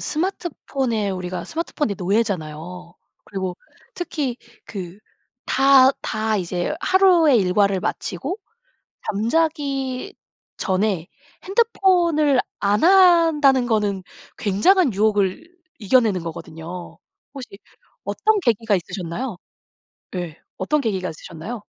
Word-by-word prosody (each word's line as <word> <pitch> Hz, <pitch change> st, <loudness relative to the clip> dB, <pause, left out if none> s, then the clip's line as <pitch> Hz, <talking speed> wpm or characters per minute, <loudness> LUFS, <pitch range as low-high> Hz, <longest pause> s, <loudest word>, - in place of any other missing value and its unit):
스마트폰에 275 Hz, -, -2 dB
우리가 185 Hz, -1 st, -4 dB
스마트폰의 305 Hz, -, -3 dB
노예잖아요. 180 Hz, -4 st, -2 dB, 0.3 s
그리고 190 Hz, -3 st, -4 dB, 0.4 s
특히 295 Hz, -8 st, -3 dB, 0.3 s
그 185 Hz, -2 st, -7 dB, 0.5 s
다, 270 Hz, -1 st, +6 dB
다 220 Hz, 0 st, -1 dB
이제 180 Hz, -, -2 dB
하루의 355 Hz, -8 st, +5 dB
일과를 195 Hz, 0 st, +2 dB
마치고 185 Hz, -, -3 dB, 0.7 s
잠자기 275 Hz, -, -1 dB, 0.4 s
전에 190 Hz, -3 st, 0 dB, 0.4 s
핸드폰을 355 Hz, -, +3 dB, 0.2 s
안 205 Hz, +4 st, +2 dB
한다는 330 Hz, -8 st, +5 dB
거는 210 Hz, -4 st, 0 dB, 0.4 s
굉장한 250 Hz, -, +3 dB
유혹을 205 Hz, -, +1 dB, 0.3 s
이겨내는 210 Hz, -4 st, +2 dB
거거든요. 165 Hz, +1 st, -8 dB, 0.4 s
혹시 260 Hz, -3 st, -8 dB, 0.6 s
어떤 435 Hz, 0 st, +1 dB
계기가 225 Hz, -, +1 dB
있으셨나요? 180 Hz, +6 st, -5 dB, 0.8 s
네. 175 Hz, -4 st, -5 dB, 0.2 s
어떤 295 Hz, +11 st, 0 dB
계기가 190 Hz, -7 st, -2 dB
있으셨나요? 170 Hz, +8 st, -8 dB
220 Hz, 245 characters per minute, -22 LUFS, 185-295 Hz, 0.8 s, 다